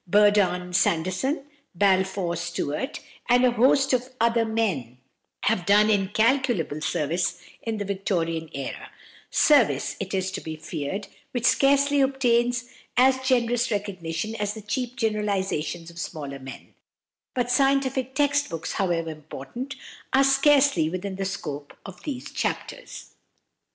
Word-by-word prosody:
Burdon 200 -3 +3
Sanderson, 185 - +1 0.3
Balfour 190 -1 +2
Stewart, 170 - -3 0.3
and 245 +1 +5
a 250 - +4
host 265 +3 +3
of 255 0 0
other 230 0 +3
men, 190 - -1 0.5
have 210 -5 +1
done 205 +3 +5
incalculable 210 - +1
service 165 +2 -1 0.2
in 225 -1 -3
the 205 - -3
Victorian 170 -5 -2
era 135 -1 -6 0.4
service, 290 -7 +3
it 195 0 -3
is 190 0 -1
to 190 - -5
be 160 0 -6
feared, 155 +4 -5 0.3
which 245 -1 -1
scarcely 280 +2 +4
obtains 245 -2 +2 0.3
as 260 +1 +5
generous 245 -2 +1
recognition 200 -2 -3
as 210 0 -2
the 220 - -9
cheap 250 +3 -3
generalisations 195 - -1
of 170 - -11
smaller 140 -4 -5
men; 135 0 -11 0.6
but 245 -1 0
scientific 265 -1 +1
text 285 0 +2
books, 165 -1 -4
however 170 -4 0
important, 155 - -7 0.4
are 270 +1 +6
scarcely 275 - +4
within 185 +2 -4
the 195 - -2
scope 150 -7 -5
of 195 - -10
these 265 -4 -5
chapters. - - -4
205 Hz, 130 wpm, -25 LUFS, 175-255 Hz, 0.6 s, are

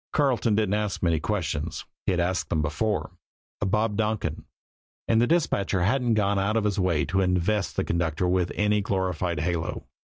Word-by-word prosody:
Carleton 125 -7 +2
didn't 105 -2 +1
ask 105 -3 -1
many 85 -3 +2
questions 80 -6 -2 0.2
he'd 90 - +2
asked 90 +1 0
them 80 -2 +1
before 90 +8 -1 0.5
of 100 - 0
Bob 105 +1 +1
Donkin 105 -8 -1 0.6
and 115 0 +3
the 120 - +3
dispatcher 100 - +1
hadn't 120 +3 +2
gone 100 -2 +2
out 105 +3 +1
of 110 - +1
his 105 -1 0
way 90 -5 +1
to 95 +1 +1
invest 90 +2 0
the - - 0
conductor 85 +1 0
with 90 -1 +1
any 105 0 +2
glorified 90 -4 -1
halo. 85 -1 -2
95 Hz, 175 wpm, -26 LUFS, 85-105 Hz, 0.6 s, and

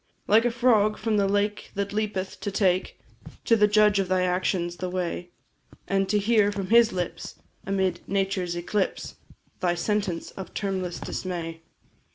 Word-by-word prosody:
Like 225 +3 +5
a - - +4
frog, 230 -3 +3
from 215 -1 0
the 200 -1 +3
lake 205 +1 -1
that 200 0 -2
leapeth, 205 -3 -2
to - - -3
take 190 -2 0 0.5
To 230 - +5
the 210 -1 +4
Judge 210 -1 +4
of 195 - 0
thy 185 0 +1
actions 180 -1 0
the 185 - -3
way, 180 -1 -3 0.6
And 195 -1 +1
to 210 - +3
hear 205 0 +3
from 195 -2 -4
His 235 -1 +6
lips, 180 -2 -4 0.3
amid 190 -1 0
nature's 190 -2 -1
eclipse, 190 +3 -2 0.4
Thy 175 -2 +1
sentence 195 -1 -2
of 190 - -9
termless 190 -3 -2
dismay. 165 -3 -5
195 Hz, 160 wpm, -26 LUFS, 185-210 Hz, 0.6 s, His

